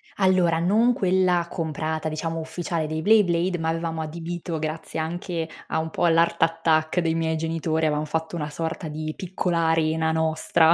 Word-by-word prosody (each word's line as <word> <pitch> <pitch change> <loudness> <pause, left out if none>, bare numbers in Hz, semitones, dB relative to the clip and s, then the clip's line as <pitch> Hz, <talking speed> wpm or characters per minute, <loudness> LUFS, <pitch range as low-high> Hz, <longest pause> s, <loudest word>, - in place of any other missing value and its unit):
Allora, 185 -4 +3
non 220 +8 +3
quella 185 -3 +2
comprata, 160 -1 -2
diciamo, 165 +1 -3
ufficiale 160 0 -3
dei 155 +1 -3
Beyblade, 180 -4 +3
ma 160 - -1
avevamo 165 0 -2
adibito 165 +1 -4
grazie 155 +1 -4
anche 165 0 -3 0.2
a 160 - 0
un 160 0 -3
po' - - 0
all' 165 -1 +4
Art 170 0 +2
Attack 165 0 +2
dei 165 -1 +1
miei 160 0 0
genitori, 160 0 -1
avevamo 150 0 0
fatto 160 +2 -3
una 150 -2 -3
sorta 160 +2 -4
di 155 +1 -4
piccola 175 -2 -1
arena 160 0 +2
nostra, 160 +1 +3
165 Hz, 170 wpm, -24 LUFS, 160-170 Hz, 0.2 s, all